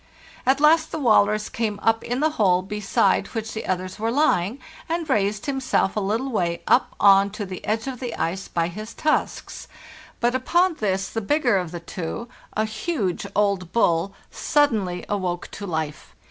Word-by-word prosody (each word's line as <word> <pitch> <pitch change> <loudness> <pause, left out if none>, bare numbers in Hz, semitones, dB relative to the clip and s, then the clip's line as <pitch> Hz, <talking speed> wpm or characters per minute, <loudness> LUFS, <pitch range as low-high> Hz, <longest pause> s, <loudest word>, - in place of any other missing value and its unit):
At 270 +1 +4
last 315 +2 +4
the - - -3
walrus 215 -5 +3
came 215 -3 -2
up 225 0 +2
in 245 +3 -2
the 310 +1 +3
hole 185 -9 +2
be 210 +2 -5
side 195 0 +2
which 220 -1 -3
the 220 - -5
others 185 +1 -3
were 225 +1 0
lying, 235 - +2 0.3
and 335 -1 -1
raised 210 -5 0
himself 265 -8 0
a - - +1
little 220 +7 -1
way 170 -6 -1
up - - +3
on 195 0 +6
to 210 -1 -4
the 185 -2 -7
edge 220 +2 -1
of 260 -3 -5
the 245 -3 -4
ice 185 +4 -2
by 165 -1 0
his 215 +6 -8
tusks; 305 0 -1 0.5
but 240 +1 +2
upon 340 +7 +2
this 195 -2 0
the 225 - -3
bigger 245 -2 +2
of 180 -2 -4
the 175 +1 -6
two, 170 +6 -5 0.3
a 215 - +1
huge 215 - -2
old 200 -3 +1
bull, 185 -4 +2 0.2
sud 290 -1 +2
denly 185 -5 -3
awoke 180 -4 -2
to 200 - -7
life. 155 -3 -4
210 Hz, 185 wpm, -23 LUFS, 185-250 Hz, 0.5 s, on